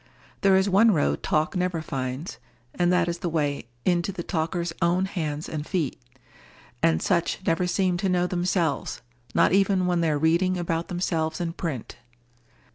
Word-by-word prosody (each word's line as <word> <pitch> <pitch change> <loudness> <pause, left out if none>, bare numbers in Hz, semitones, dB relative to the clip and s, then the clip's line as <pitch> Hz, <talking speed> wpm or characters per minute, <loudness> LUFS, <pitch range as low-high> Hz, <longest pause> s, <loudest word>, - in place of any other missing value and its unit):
There 195 -1 +5
is 190 +1 +3
one 200 +4 +5
road 145 - +1
talk 155 +4 0
never 180 -2 0
finds, 130 -4 -4 0.3
and 175 0 +2
that 180 -1 +3
is 170 0 -2
the 175 - -2
way 145 -6 -1 0.2
into 175 +1 +1
the 180 -2 -6
talker's 170 0 -2
own 175 +2 +2
hands 155 -5 -3
and 150 -2 -4
feet. 155 -5 -2 0.8
And 80 -1 +2
such 170 - +1
never 165 +2 +1
seem 180 -1 +1
to 195 +1 0
know 180 -1 +2
themselves—not 155 -9 -1
even 195 -1 +3
when 175 -1 +1
they 165 - +2
are 150 - +1
reading 170 +4 +2
about 170 -1 -2
themselves 165 -3 -1
in 170 -1 -2
print. 155 -10 -5
170 Hz, 165 wpm, -25 LUFS, 155-180 Hz, 0.8 s, There